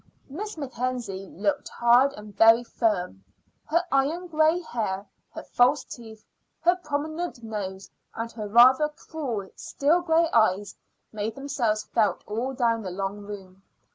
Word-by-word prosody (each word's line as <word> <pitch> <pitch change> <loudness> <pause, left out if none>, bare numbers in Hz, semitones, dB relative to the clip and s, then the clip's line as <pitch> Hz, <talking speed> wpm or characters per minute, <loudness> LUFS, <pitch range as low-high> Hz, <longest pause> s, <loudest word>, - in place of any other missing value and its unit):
Miss 410 +7 -6
Mackenzie 250 -8 -4
looked 285 - -2
hard 245 +4 +4
and 210 -3 -11
very 225 +1 +6
firm. 180 - -1 0.4
Her 335 +3 +2
iron 290 +6 +1
gray 315 0 +2
hair, 210 - -3 0.3
her - - -8
false 255 +4 +3
teeth, 220 -3 -11 0.4
her 350 +2 +4
prominent 310 -3 -4
nose, 195 -3 -5 0.3
and 230 0 -4
her 215 -3 -6
rather 255 +7 +6
cruel 265 -10 -6
steel 310 +5 +1
gray 330 -1 +3
eyes 205 -3 +2 0.4
made 215 +1 -3
themselves 255 -6 -1
felt 210 -5 0
all 240 +5 -3
down 230 -2 +1
the 190 - -5
long 195 +2 -4
room. 195 -2 -10
235 Hz, 140 wpm, -26 LUFS, 210-290 Hz, 0.4 s, very